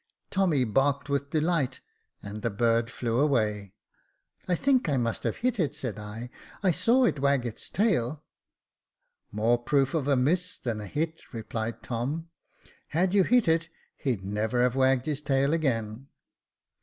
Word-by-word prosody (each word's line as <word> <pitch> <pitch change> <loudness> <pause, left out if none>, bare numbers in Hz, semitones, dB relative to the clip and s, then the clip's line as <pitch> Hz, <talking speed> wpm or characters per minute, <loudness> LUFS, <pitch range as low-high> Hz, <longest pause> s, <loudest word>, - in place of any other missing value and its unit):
Tommy 180 -9 +2
barked 140 +5 +1
with 140 0 -1
delight, 155 -4 0 0.4
and 105 +1 -7
the 115 - 0
bird 115 +2 +1
flew 120 -1 -1
away. 105 -8 +1 0.7
I 180 - +2
think 260 - +2
I 140 - +2
must 115 -2 -1
have - - 0
hit 250 -3 +1
it," 155 -5 0
said 115 -5 -5
I; 110 +4 -7
" - - -21
I 185 - +4
saw 240 - +3
it 150 - +1
wag 140 -2 +2
its 115 -2 -6
tail." 155 - 0 0.6
" - - -53
More 120 +2 +3
proof 135 +2 +1
of 150 -4 0
a 140 - +4
miss 170 +8 +1
than 115 -4 -3
a 105 - -7
hit," 160 +5 -4
replied 110 0 -4
Tom. 145 +8 -3 0.3
" - - -26
Had 180 +4 +1
you 200 -2 +5
hit 245 +1 +3
it, 165 0 +2 0.3
he'd 115 -9 -2
never 110 +5 0
have 125 0 +2
wagged 130 -1 +3
his 150 -2 -2
tail 140 0 +1
again." 125 -5 -1
135 Hz, 170 wpm, -28 LUFS, 115-160 Hz, 0.7 s, you